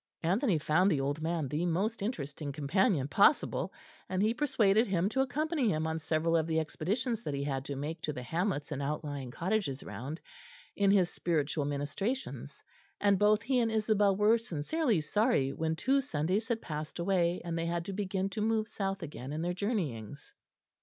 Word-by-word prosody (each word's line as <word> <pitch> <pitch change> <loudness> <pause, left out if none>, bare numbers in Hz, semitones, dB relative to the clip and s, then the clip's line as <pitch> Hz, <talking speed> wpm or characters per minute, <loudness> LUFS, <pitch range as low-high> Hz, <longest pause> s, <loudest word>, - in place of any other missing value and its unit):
Anthony 190 - +2
found 155 +5 +3
the 155 -7 +2
old 145 +3 -1
man 160 -2 -1
the 150 +6 -1
most 200 +7 0
interesting 150 - -4
companion 150 - +1
possible, 200 - +3 0.4
and 185 +1 +1
he 220 +2 +3
persuaded 225 -5 +3
him 190 0 +1
to 265 +4 +1
accompany 285 0 0
him 155 -4 0
on 160 0 -1
several 160 +1 +1
of 160 -1 +2
the 160 -1 +1
expeditions 215 - -2
that 145 -10 -3
he 140 - -2
had 135 -2 -2
to 140 - -4
make 150 +5 -4
to 150 - -2
the 125 -4 -6
hamlets 165 - -1
and 140 -1 -3
outlying 145 -2 -3
cottages 170 - -1
round, 140 +7 -6 0.6
in 200 -1 +3
his 190 -3 +4
spiritual 155 -3 0
ministrations; 145 - -3 0.4
and 200 -2 +3
both 210 +1 +4
he 255 +1 +2
and 230 -2 +1
Isabel 210 -2 +3
were 210 +3 +4
sincerely 225 - 0
sorry 205 - +1
when 160 0 -1
two 270 +10 +2
Sundays 185 - -1
had 230 -1 -1
passed 155 -1 -5
away, 175 -1 +1
and 170 -1 -2
they 165 0 -1
had 170 0 -2
to 195 - -4
begin 195 -1 -1
to 215 - -3
move 220 0 +1
south 195 -3 -3
again 140 -4 -7
in 155 +2 -3
their 175 +1 0
journeyings. 155 - -3
175 Hz, 185 wpm, -31 LUFS, 150-215 Hz, 0.6 s, his